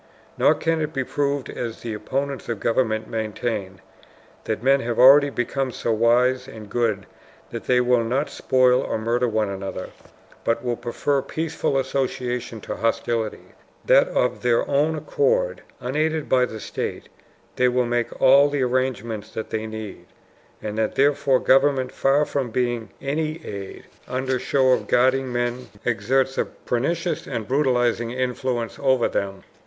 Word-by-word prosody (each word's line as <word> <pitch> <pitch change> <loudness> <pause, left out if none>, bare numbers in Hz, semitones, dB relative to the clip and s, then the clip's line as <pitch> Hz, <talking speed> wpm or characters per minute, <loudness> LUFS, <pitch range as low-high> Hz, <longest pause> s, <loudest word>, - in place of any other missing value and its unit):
Nor 155 - +4
can 165 +1 0
it 155 0 -3
be 135 - -1
proved 140 0 -1
as 115 -2 -5
the 115 -2 -4
opponents 135 +6 -3
of 115 -3 -2
government 110 -1 0
maintain 110 -4 -3 0.6
that 110 +1 -3
men 135 +1 +4
have 120 -2 -3
already 140 +3 +8
become 135 +1 -2
so 115 - -2
wise 125 +3 +2
and 110 -4 -11
good 110 -5 0 0.5
that - - -6
they 125 -1 +3
will 125 -1 +3
not 130 +6 0
spoil 130 -1 +3
or - - -2
murder 120 +3 0
one 110 -2 0
another, 95 0 -5 0.5
but 115 +1 0
will 120 -1 -1
prefer 135 +4 -1
peaceful 155 0 -2
associations 125 -4 -2
to - - -5
hostilities; 115 0 -2 0.3
that - - +5
of 125 - 0
their 120 -1 +2
own 150 +3 +2
accord, 480 - 0 0.2
unaided 155 +4 -1
by 125 -1 +3
the 110 -3 -8
state, - - -5 0.5
they 125 - +4
will 125 0 +2
make 120 0 -2
all 140 +2 +6
the 145 -2 0
arrangements 120 -4 -1
that 110 - -6
they 110 0 -2
need, 110 -5 -8 0.6
and 105 0 -3
that 110 - 0
therefore 140 -1 +3
government, 135 -1 +3
far 140 +2 +2
from 135 -4 -2
being 120 -2 -1
any 155 +3 -1
aid, 100 -2 -7 0.2
under 130 0 -1
show 130 0 +2
of 125 - +1
guarding 130 +1 +2
men 120 +1 -2 0.2
exerts 130 +4 +1
a - - +2
pernicious 170 +8 -2
and 110 -2 -4
brutalizing 125 -4 +1
influence 125 -3 -2
over 130 -3 +3
them. 95 -1 -3
125 Hz, 155 wpm, -23 LUFS, 115-135 Hz, 0.6 s, already